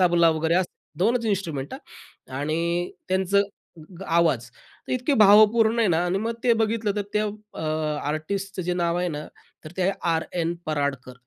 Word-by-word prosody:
तबला 170 -2 +5
वगैरे 160 +3 +2 0.4
2 225 +7 +3
च - - -7
इन्स्ट्रुमेंट 165 -10 -2
हां 130 +1 -12
आणि 170 +3 -1 0.2
त्यांचं 190 +2 +2 0.6
आवाज 160 -8 +2
तर 125 - -12
इतके 255 +3 +1
भावपूर्ण 220 +2 +6
आहे 220 -4 +3
ना 165 -1 +2
आणि 185 +2 0
मग 225 +2 -2
ते 240 - +5
बघितलं 220 -1 +1
तर, 205 - 0
त्या 210 0 +1 0.3
अ, - - -6 0.5
आर्टिस्टचं 190 +5 -3
जे 180 +1 -1
नाव 170 -1 0
आहे 180 - 0
ना 150 -2 -5 0.4
तर 155 - -8
ते 185 - 0
आहे 190 - +3 0.2
आरएन 165 +1 -1
पराडकर. 140 -4 -2
175 Hz, 165 wpm, -24 LUFS, 160-205 Hz, 0.6 s, भावपूर्ण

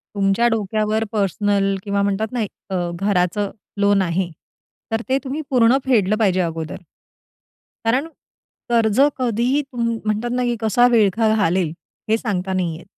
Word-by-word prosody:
तुमच्या 200 +4 +2
डोक्यावर 215 0 0
पर्सनल 200 -1 +1
किंवा 200 0 0
म्हणतात 200 +2 0
ना, 245 -2 -2
एक 205 -2 -7
अ, 175 -2 -1
घराचं 195 0 0 0.3
लोन 200 -1 +3
आहे, 180 0 -1 0.6
तर 225 0 0
ते 265 - +3
तुम्ही 280 +3 -3
पूर्ण 245 -1 +4
फेडलं 215 -6 +3
पाहिजे 195 -4 +2
अगोदर. 165 -2 -3 1.1
कारण 255 +6 +2 0.6
कर्ज 230 -1 +2 0.2
कधीही 250 +3 +1
तुं 255 -4 -5 0.2
म्हणतात 215 +3 -1
ना, 250 0 0
की 240 -1 0
कसा 225 +3 +4
विळखा 220 -1 +3
घालेल, 180 -5 +1 0.4
हे 220 - +4
सांगता 190 -5 -2
नाही 175 -3 -1
येत. 170 - -14
210 Hz, 150 wpm, -20 LUFS, 195-235 Hz, 1.1 s, पूर्ण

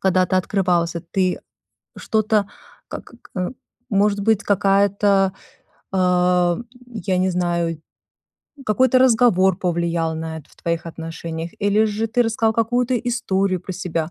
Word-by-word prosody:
когда 185 -1 +2
ты 185 - 0
открывался, 180 -3 0
ты 185 -2 0 0.6
что-то 215 -2 +1 0.4
как - - -8 0.2
к - - -19
э, 180 - -1 0.4
может 205 0 +2
быть, 220 0 +2
какая-то, 195 0 +2 0.6
а, 180 -1 +2 0.3
я 200 -6 -3
не 185 +1 +2
знаю, 170 -2 -1 0.8
какой-то 255 +4 +3
разговор 220 -7 +4
повлиял 170 -2 -1
на 160 0 -5
это 150 - -15
в - - -22
твоих 170 0 -2
отношениях, 165 0 -6
или 205 +2 +3
же 215 +1 -1
ты 245 +2 +2
рассказал 225 -1 +1
какую-то 245 +3 +1
историю 200 -6 -1
про 185 - -6
себя, 170 -3 -3
190 Hz, 130 wpm, -21 LUFS, 175-215 Hz, 0.8 s, разговор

